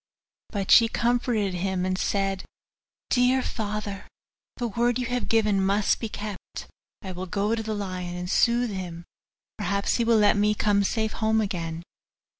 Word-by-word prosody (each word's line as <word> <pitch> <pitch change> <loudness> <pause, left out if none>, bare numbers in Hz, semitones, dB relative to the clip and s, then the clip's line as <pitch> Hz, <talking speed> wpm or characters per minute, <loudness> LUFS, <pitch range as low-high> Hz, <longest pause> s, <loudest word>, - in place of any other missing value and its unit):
But 200 -3 -2
she 230 - +8
comforted 235 -4 0
him, 185 0 -1
and 185 0 0
said, 195 0 -1 0.7
'Dear 255 +1 +3
father, 210 -2 -4 0.5
the 240 - -1
word 235 +3 +1
you 250 - -2
have 245 +1 -2
given 210 -4 +3
must 200 +2 +2
be 225 - -4
kept; 205 -2 -7 0.4
I 190 - -5
will 185 +1 -6
go 205 +4 0
to 230 - -1
the 220 -1 -3
lion, 185 -3 -4
and 180 0 -4
soothe 235 +4 +2
him: 175 -3 -6 0.5
perhaps 200 +2 0
he 235 - +1
will 230 -1 +4
let 210 -1 +4
me 210 +1 +2
come 205 -1 +2
safe 220 +2 0
home 220 0 +1
again. 170 -5 -3
205 Hz, 165 wpm, -26 LUFS, 190-225 Hz, 0.7 s, she